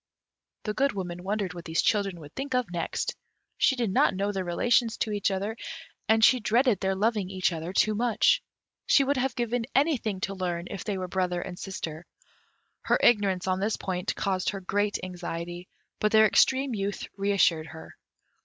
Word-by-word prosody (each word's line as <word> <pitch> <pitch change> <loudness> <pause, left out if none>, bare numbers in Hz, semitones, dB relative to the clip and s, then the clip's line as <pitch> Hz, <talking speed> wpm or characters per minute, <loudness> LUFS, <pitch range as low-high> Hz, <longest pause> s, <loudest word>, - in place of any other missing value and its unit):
The 210 - -2
Good 275 +5 +1
Woman 180 -3 -5
wondered 200 -1 -2
what 175 -1 -9
these 165 -1 0
children 200 -4 +1
would 145 0 -12
think 270 -1 -3
of 250 -7 0
next; 170 -2 -2 0.4
she 265 - +3
did 235 -6 -1
not 190 - +3
know 200 +2 0
their 190 -2 -2
relation 230 +7 +2
to 220 -1 -3
each 205 -1 +1
other, 200 +3 -2 0.5
and 220 0 +6
she 255 - +5
dreaded 235 -1 +2
their 190 0 0
loving 210 -1 0
each 185 -2 0
other 165 +2 -5
too 215 +3 +2
much. 230 +1 +3 0.5
She 280 - +5
would 280 +1 0
have 255 -1 0
given 240 -1 -1
anything 260 - +1
to 195 - -2
learn 175 -2 -3
if 195 - -5
they 205 -3 -2
were 185 -1 -3
brother 180 -1 -1
and 180 -2 -8
sister; 170 -3 -6 0.7
her - - +2
ignorance 200 -5 +3
on 185 0 0
this 205 +3 0
point 180 0 -3
caused 190 -2 0
her 200 - -4
great 205 +2 0
anxiety, 175 -1 -6 0.3
but 215 - +1
their 220 0 +7
extreme 260 +4 +3
youth 200 -1 -3
re 200 0 0
assured 165 -5 +3
her. 160 0 -11
195 Hz, 190 wpm, -27 LUFS, 180-225 Hz, 0.7 s, their